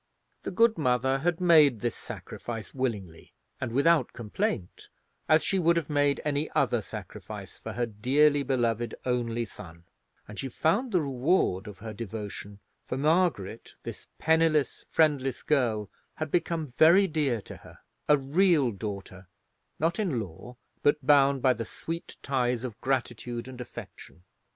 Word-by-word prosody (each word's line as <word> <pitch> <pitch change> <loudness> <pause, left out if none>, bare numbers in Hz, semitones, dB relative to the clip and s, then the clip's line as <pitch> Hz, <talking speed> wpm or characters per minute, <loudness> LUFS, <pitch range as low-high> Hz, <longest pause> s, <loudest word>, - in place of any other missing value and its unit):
The - - -4
good 225 +1 +3
mother 130 0 +2
had 170 +3 0
made 155 - +5
this 120 -1 -1
sacrifice 115 -2 -7
willingly 105 -11 -4 0.3
and 130 -3 -3
without 140 +1 +3
complaint, 105 -5 -3 0.4
as 155 0 +5
she 195 - +1
would 170 0 +3
have 160 -2 -2
made 145 -1 +2
any 150 +1 0
other 130 -6 +2
sacrifice - - -9
for - - -6
her 120 - 0
dearly 140 +7 +3
beloved 120 -4 0
only 120 -2 -1
son; 85 -5 -12 0.4
and 105 - -9
she 135 - -3
found 200 - +1
the 180 -4 +3
reward 130 - +1
of 105 -2 -9
her 110 +2 -7
devotion; 105 -2 -7 0.3
for 130 - -3
Margaret, 150 - 0
this - - -8
penniless, 160 -2 +2
friendless 145 -5 +1
girl, 115 -8 +1 0.3
had 155 -2 -4
become 170 -2 0
very 160 +9 +5
dear 150 -9 0
to - - -10
her—a 150 - -2
real 145 -1 +3
daughter, 100 -2 -7 0.5
not 165 +4 0
in 175 - 0
law, 95 +5 -8 0.3
but 145 -1 +2
bound 140 -2 +4
by 130 -2 +5
the 115 -1 -4
sweet 165 +8 -6
ties 125 -3 0
of 120 -5 -6
gratitude 120 -2 -2
and 130 -1 -8
affection. 110 -7 -11
130 Hz, 145 wpm, -28 LUFS, 115-155 Hz, 0.5 s, made